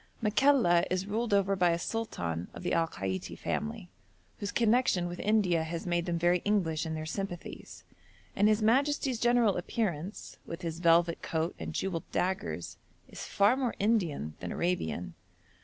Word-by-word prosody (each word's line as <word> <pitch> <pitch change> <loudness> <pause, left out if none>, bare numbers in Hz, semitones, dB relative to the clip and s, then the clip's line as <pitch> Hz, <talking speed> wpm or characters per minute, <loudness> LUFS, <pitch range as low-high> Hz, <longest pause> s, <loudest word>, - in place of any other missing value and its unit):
Makalla 220 -6 +4
is 185 +1 -1
ruled 220 +3 -2
over 200 -1 +3
by 180 -2 +3
a 170 - +2
sultan 90 - -3
of - - -8
the - - -1
Al 165 -1 +2
Kaiti 95 - -4
family, 220 -3 -3 0.5
whose 200 0 -3
connection 230 -6 +2
with 175 0 -6
India 195 -6 +2
has 165 +1 -5
made 175 -1 0
them 170 -1 0
very 175 +1 +3
English 165 -6 0
in 160 - -3
their 155 0 -4
sympathies, 175 +1 -6 0.5
and 205 +1 +4
his 215 0 +3
majesty's 265 +2 +2
general 240 -4 +3
appearance, 180 -1 -3
with 165 +2 -8
his 165 -1 -4
velvet 170 0 +3
coat 160 +1 -1
and - - -5
jewelled 185 -4 -3
daggers, 85 - -2 0.3
is - - -7
far 205 +5 +3
more 260 -3 -1
Indian 175 - 0
than 90 - -5
Arabian. 90 - -2
180 Hz, 160 wpm, -30 LUFS, 165-215 Hz, 0.5 s, Makalla